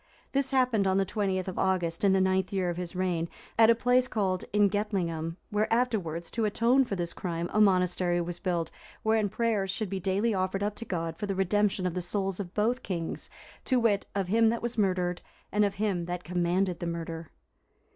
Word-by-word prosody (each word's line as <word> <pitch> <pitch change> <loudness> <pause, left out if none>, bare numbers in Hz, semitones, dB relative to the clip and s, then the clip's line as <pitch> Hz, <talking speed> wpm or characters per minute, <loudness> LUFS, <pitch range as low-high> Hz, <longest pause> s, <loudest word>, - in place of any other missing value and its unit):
This 275 -1 +1
happened 250 -7 +2
on 190 0 +2
the 195 - +2
20th 190 -2 -1
of 185 - -4
August, 180 -3 0
in 200 - +5
the 190 - +4
ninth 190 0 +1
year 185 -3 0
of 170 - -6
his 180 0 -5
reign, 175 -3 -1 0.3
at 225 0 +6
a 230 - +6
place 250 +2 +3
called 190 -6 -1
Ingetlingum, 195 -6 0 0.2
where 210 +1 0
afterwards, 200 -9 0
to 230 -2 0
atone 235 +5 +3
for 205 - -3
this 170 -2 -3
crime, 170 -2 -3
a 215 - +4
monastery 180 -3 +3
was 175 0 -3
built,(363) 175 -4 -1 0.3
wherein 220 -2 +2
prayers 215 -2 0
should 200 0 -2
be 195 - -2
daily 195 +5 +1
offered 190 +1 -1
up 205 0 0
to 230 - -5
God 165 -4 -3
for 205 - -3
the 195 - -1
redemption 195 0 +1
of 180 - 0
the 180 - -2
souls 195 +1 -2
of 185 -2 -6
both 235 +5 +1
kings, 170 -7 -4 0.4
to 255 -2 +3
wit, 210 -4 +2
of 195 -2 0
him 225 +3 +4
that 235 +1 -2
was 240 0 -2
murdered, 180 -4 0 0.3
and 210 0 +3
of 200 -1 0
him 195 -4 -1
that 175 0 -4
commanded 180 +1 0
the 175 - -3
murder. 165 -1 -5
190 Hz, 205 wpm, -29 LUFS, 175-215 Hz, 0.4 s, at